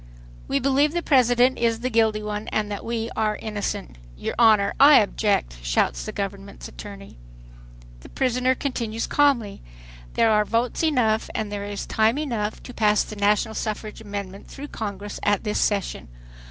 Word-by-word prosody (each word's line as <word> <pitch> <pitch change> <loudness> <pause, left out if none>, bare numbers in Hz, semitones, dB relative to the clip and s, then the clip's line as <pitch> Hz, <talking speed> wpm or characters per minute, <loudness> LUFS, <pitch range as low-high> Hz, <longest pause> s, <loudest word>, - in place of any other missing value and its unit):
"We - - +1
believe 275 +3 +2
the 345 -1 -1
President 250 -2 +3
is 230 -1 +1
the 255 +1 -2
guilty 220 -2 +2
one 210 0 -4
and 210 -1 -2
that 200 - -5
we 230 0 -3
are 215 -1 0
innocent." 200 - -4 0.2
"Your - - -3
Honor, 215 -4 +5
I 285 +2 +9
object," 200 - +1
shouts - - 0
the - - -3
Government's 200 0 -6
attorney. 200 - -11 0.8
The - - -14
prisoner 255 0 +1
continues 230 -5 -3
calmly: 265 -8 +1 0.5
"There 225 - +4
are 210 0 +4
votes 230 +3 -1
enough 240 -8 +1
and 215 -2 -2
there 200 -1 -4
is 205 -1 -5
time 220 +4 +2
enough 230 -8 -3
to 250 - -10
pass 210 -2 +3
the 215 - -9
national 210 +2 +1
suffrage 215 0 -4
amendment 200 -2 -7
through 285 +1 -9
Congress 205 -1 -6
at 205 -1 +1
this 210 -2 -1
session. 200 - -1
215 Hz, 165 wpm, -24 LUFS, 205-240 Hz, 0.8 s, I